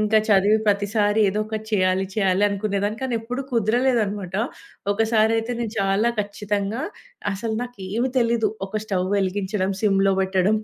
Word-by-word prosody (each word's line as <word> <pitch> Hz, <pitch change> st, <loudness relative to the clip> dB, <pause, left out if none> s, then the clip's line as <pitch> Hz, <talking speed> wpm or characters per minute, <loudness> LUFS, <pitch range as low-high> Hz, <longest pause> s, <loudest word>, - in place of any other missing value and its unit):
ఇంకా 215 Hz, +1 st, +4 dB
చదివి 205 Hz, +2 st, +5 dB
ప్రతిసారి 205 Hz, +1 st, +2 dB
ఏదో 210 Hz, +2 st, -1 dB
ఒకటి 220 Hz, 0 st, -5 dB
చేయాలి, 185 Hz, -1 st, +2 dB
చేయాలి 195 Hz, -2 st, +2 dB
అనుకునేదాన్ని. 205 Hz, +1 st, -1 dB
కానెప్పుడూ 245 Hz, +1 st, -2 dB
కుదరలేదనమాట. 220 Hz, -5 st, +1 dB, 0.6 s
ఒకసారి 220 Hz, +1 st, +2 dB
అయితే, 225 Hz, +2 st, -3 dB
నేను 225 Hz, -3 st, -3 dB
చాలా 195 Hz, +4 st, +2 dB
ఖచ్చితంగా 205 Hz, +2 st, -2 dB, 0.5 s
అసలు 220 Hz, +3 st, -3 dB
నాకేమీ 235 Hz, +1 st, -3 dB
తెలీదు, 230 Hz, -2 st, +2 dB, 0.2 s
ఒక 215 Hz, +2 st, -3 dB
స్టవ్ 185 Hz, -3 st, -1 dB
వెలిగించడం, 195 Hz, 0 st, -1 dB
సిమ్‌లో 195 Hz, -2 st, +3 dB
పెట్టడం, 190 Hz, +2 st, +2 dB
210 Hz, 130 wpm, -23 LUFS, 195-225 Hz, 0.6 s, చదివి